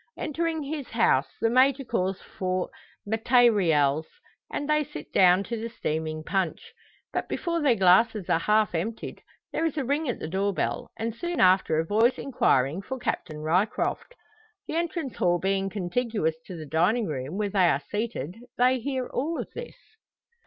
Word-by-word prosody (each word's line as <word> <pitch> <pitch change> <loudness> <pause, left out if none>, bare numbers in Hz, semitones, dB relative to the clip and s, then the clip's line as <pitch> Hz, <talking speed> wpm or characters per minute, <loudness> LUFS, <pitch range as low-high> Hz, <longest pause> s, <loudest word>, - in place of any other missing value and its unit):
Entering 320 +1 -2
his 285 -1 -5
house, 220 - +3
the 225 - +3
Major 265 +2 +4
calls 190 -5 -1
for 185 -1 -3 0.4
"matayrials," 200 - +3 0.4
and 290 - -3
they 300 0 +3
sit 300 +1 -10
down 185 +1 +5
to 230 +1 -4
the 230 - -4
steaming 155 -7 -3
punch. 190 -2 -2 0.4
But - - -2
before 335 -2 -1
their 275 -5 +4
glasses 190 +1 +4
are 170 -3 +2
half 210 +1 +2
emptied, 210 +7 -4 0.3
there - - 0
is 320 -2 -1
a 285 - 0
ring 285 +2 0
at 240 - -1
the - - -5
door 195 +3 -1
bell, - - -2
and 225 0 -2
soon 345 +8 -4
after 185 -3 +4
a 160 - +1
voice 230 +7 +3
inquiring 160 - +1
for 260 +6 -5
"Captain 155 -10 -3
Ryecroft." 185 - 0 0.5
The - - -4
entrance 330 - -2
hall 175 -1 +2
being 195 +2 0
contiguous 200 -2 -1
to 180 - -7
the 155 - -7
dining 180 +10 +2
room 145 +2 -4
where 210 -1 0
they 190 -3 +4
are 140 -1 0
seated, 210 -5 -3 0.2
they 255 +1 +4
hear 260 +1 -2
all 310 +8 -2
this. 480 0 -7
210 Hz, 165 wpm, -26 LUFS, 175-260 Hz, 0.5 s, down